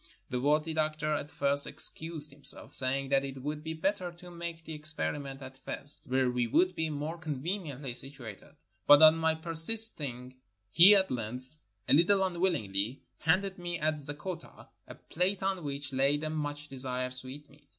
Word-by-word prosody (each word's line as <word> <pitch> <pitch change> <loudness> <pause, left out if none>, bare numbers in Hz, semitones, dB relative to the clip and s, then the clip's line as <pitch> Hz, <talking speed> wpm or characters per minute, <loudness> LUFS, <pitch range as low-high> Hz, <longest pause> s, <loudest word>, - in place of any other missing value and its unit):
The 125 -1 -2
worthy 150 +3 +1
doctor 155 -1 -1
at 150 0 -4
first 140 0 +2
excused 155 -2 +2
himself, 140 0 +3
saying 135 +1 +3
that 135 0 +2
it 135 -1 -8
would 150 +1 -5
be 160 0 -5
better 185 +2 -2
to 175 +1 -14
make 170 -1 -7
the 160 - -7
ex 155 0 -4
periment 140 -3 -5
at 130 0 -11
Fez, 145 +2 -6
where 130 -2 0
we 125 -1 -1
would 185 +10 +2
be 160 -2 -2
more 155 +3 -5
conveniently 150 -3 -5
situated, 130 -5 -5 0.3
but 145 +1 +8
on 155 0 +8
my 160 0 0
persisting 160 - +3 0.4
he 185 +5 +8
at 190 -5 +1
length, 125 +3 -6 0.3
a - - +3
little 190 +6 +4
un 180 -2 -3
willingly, 115 - -1 0.2
handed 185 +4 0
me 175 -1 -4
at 155 -1 0
Zeggota 150 +5 -7 0.2
a - - -11
plate 185 +3 -2
on 190 -2 -2
which 140 -1 -4
lay 135 +2 +2
the 155 +1 -5
much 145 -1 -5
desired 130 -1 -4
sweetmeat. 140 +3 -8
150 Hz, 170 wpm, -29 LUFS, 135-165 Hz, 0.4 s, but